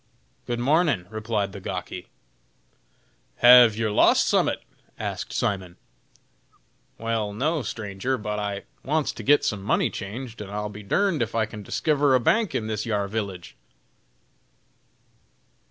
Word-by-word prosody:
"Good 120 - -1
mornin'!" 145 - +2
replied 110 -2 -2
the 100 - -8
gawky. 90 -1 -6 1.3
"Have 120 - +8
yer 110 -2 0
lost 105 - +4
summat?" - - +1 0.3
asked - - -4
Simon. 95 -3 -2 1.2
"Wal, 115 -2 -2
no, 150 +8 0
stranger, 105 +2 -3
but 105 -1 -3
I 100 -1 -3 0.2
wants 150 +2 0
to - - -9
git 145 +1 +4
some 105 -2 -1
money 95 - +1
changed, 115 +3 -7
and 100 - -7
I'll 105 +1 -3
be 105 0 -9
durned 170 - +1
if 115 -1 -2
I 110 -1 +2
can 105 -1 -9
diskiver 145 - +2
a - - +4
bank 215 - +1
in 110 - -1
this 110 -1 -2
yar 105 -3 -1
village." 100 -4 -5
110 Hz, 140 wpm, -25 LUFS, 100-125 Hz, 1.3 s, Have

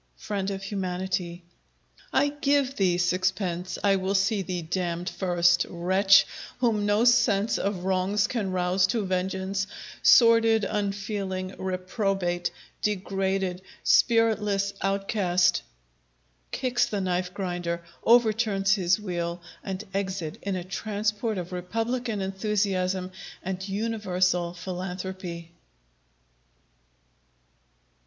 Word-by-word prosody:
FRIEND 200 -2 -3
OF 195 -1 -4
HUMANITY 185 -2 -3 0.7
I 290 - +3
give 285 -2 +1
thee 185 -3 +2
sixpence! 180 0 0
I 200 -1 +4
will 190 +1 -1
see 200 +1 +2
thee 180 -2 -4
damned 175 +1 -2
first 175 -2 +2
Wretch! 195 +3 +4 0.3
whom 220 -4 +1
no 210 +3 +3
sense 225 -3 +3
of 195 -2 -2
wrongs 190 +2 +1
can 210 -3 -2
rouse 185 0 +2
to 220 0 -1
vengeance! 190 +1 -1 0.3
Sordid, 230 -2 +6
unfeeling, 195 -2 -2
reprobate, 185 -1 -1 0.3
degraded, 195 -2 -1 0.2
Spiritless 210 -4 +3
outcast! 195 -2 +1 0.9
[_Kicks 250 -2 0
the 205 - -2
Knife 180 -1 -1
grinder, 175 -3 -3 0.2
overturns 220 -4 +4
his 190 -1 +2
wheel, 175 -3 -3 0.2
and 195 +1 -4
exit 190 -2 -3
in 200 -1 -2
a 180 - -3
transport 210 +3 -2
of 180 0 -5
republican 225 +5 -2
enthusiasm 190 -2 -1 0.3
and 190 +1 -4
universal 185 -5 0
philanthropy. 180 -1 -6
190 Hz, 100 wpm, -26 LUFS, 180-205 Hz, 0.9 s, Sordid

